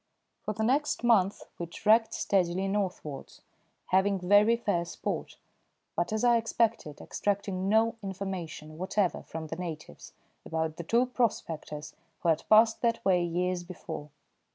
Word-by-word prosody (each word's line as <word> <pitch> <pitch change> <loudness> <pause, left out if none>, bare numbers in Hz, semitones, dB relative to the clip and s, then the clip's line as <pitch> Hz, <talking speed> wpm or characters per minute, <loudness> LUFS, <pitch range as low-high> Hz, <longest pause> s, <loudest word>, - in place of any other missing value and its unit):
For 210 - -4
the 220 - -1
next 275 +3 +1
month 205 -5 +3 0.2
we 170 - -3
trekked 225 +6 +3
steadily 190 0 +1
northwards, 185 -8 -4 0.5
having 190 +1 +3
very 205 +5 +4
fair 200 -7 0
sport; 170 - -4 0.6
but, 175 - -1
as 220 +1 -1
I 240 -1 +5
expected, 225 -8 0
extracting 195 -2 -2
no 225 +2 +3
information 185 -6 -6
whatever 185 0 0
from 160 0 -7
the 160 +1 -6
natives 160 - -7 0.3
about 160 -1 -2
the 170 - -5
two 235 +8 +3
prospectors 160 - -2 0.3
who 170 - +3
had 160 +2 0
passed 220 +1 +6
that 230 -1 0
way 180 -2 +4
years 180 +1 -1
before. 170 -4 -7
190 Hz, 140 wpm, -29 LUFS, 170-220 Hz, 0.6 s, passed